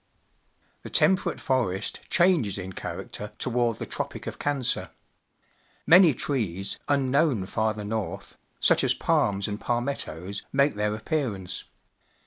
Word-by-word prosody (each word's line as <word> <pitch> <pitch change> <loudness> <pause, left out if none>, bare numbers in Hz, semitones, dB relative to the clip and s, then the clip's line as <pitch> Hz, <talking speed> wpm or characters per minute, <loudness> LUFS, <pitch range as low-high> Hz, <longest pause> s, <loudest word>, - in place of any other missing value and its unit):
The - - -9
Temperate 190 0 +3
forest 115 -7 -1
changes 170 - +3
in 95 0 -6
character 105 +2 -6
toward 120 -2 0
the - - -5
Tropic - - -5
of - - -6
Cancer. 140 -4 0 1.0
Many 170 -3 +7
trees, 100 - -2
unknown 140 - +2
farther 110 +1 -1
north, 110 0 -4 0.2
such - - +4
as - - +2
palms 100 -1 +1
and 105 0 -5
palmettos, 110 - -2
make 140 +2 +3
their 105 0 -1
appearance. 110 - -3
115 Hz, 115 wpm, -26 LUFS, 100-140 Hz, 1.0 s, Many